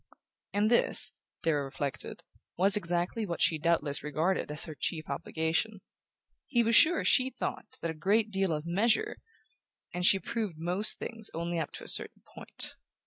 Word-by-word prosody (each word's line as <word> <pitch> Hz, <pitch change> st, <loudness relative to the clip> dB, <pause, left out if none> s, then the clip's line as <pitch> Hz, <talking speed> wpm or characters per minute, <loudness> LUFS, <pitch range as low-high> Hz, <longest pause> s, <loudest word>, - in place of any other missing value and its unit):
And 210 Hz, +2 st, +1 dB
this, 215 Hz, -2 st, +5 dB, 0.3 s
Darrow 150 Hz, -4 st, +1 dB
reflected, 135 Hz, -1 st, -5 dB, 0.3 s
was 195 Hz, +3 st, +5 dB
exactly 175 Hz, +3 st, -1 dB
what 175 Hz, -5 st, -4 dB
she 160 Hz, -, +2 dB
doubtless 150 Hz, -3 st, +1 dB
regarded 155 Hz, +6 st, -1 dB
as 150 Hz, +1 st, +2 dB
her 160 Hz, -, -7 dB
chief 155 Hz, +1 st, -3 dB
obligation: 160 Hz, +7 st, -2 dB, 0.7 s
he 240 Hz, -3 st, +2 dB
was 230 Hz, 0 st, +2 dB
sure 335 Hz, +7 st, +5 dB
she 260 Hz, 0 st, +4 dB
thought 255 Hz, -, -6 dB
a 165 Hz, -1 st, -2 dB
great 210 Hz, +7 st, +1 dB
deal 195 Hz, -2 st, 0 dB
of 150 Hz, 0 st, -3 dB
"measure", 205 Hz, +7 st, +1 dB, 0.8 s
and 180 Hz, -, -3 dB
approved 215 Hz, -2 st, -3 dB
of -, -, -16 dB
most 180 Hz, +6 st, +2 dB
things 225 Hz, -2 st, -5 dB
only 170 Hz, +1 st, -2 dB
up 160 Hz, -, -4 dB
to -, -, -8 dB
a -, -, -10 dB
certain -, -, +2 dB
point. -, -, -4 dB
175 Hz, 160 wpm, -30 LUFS, 160-215 Hz, 0.8 s, this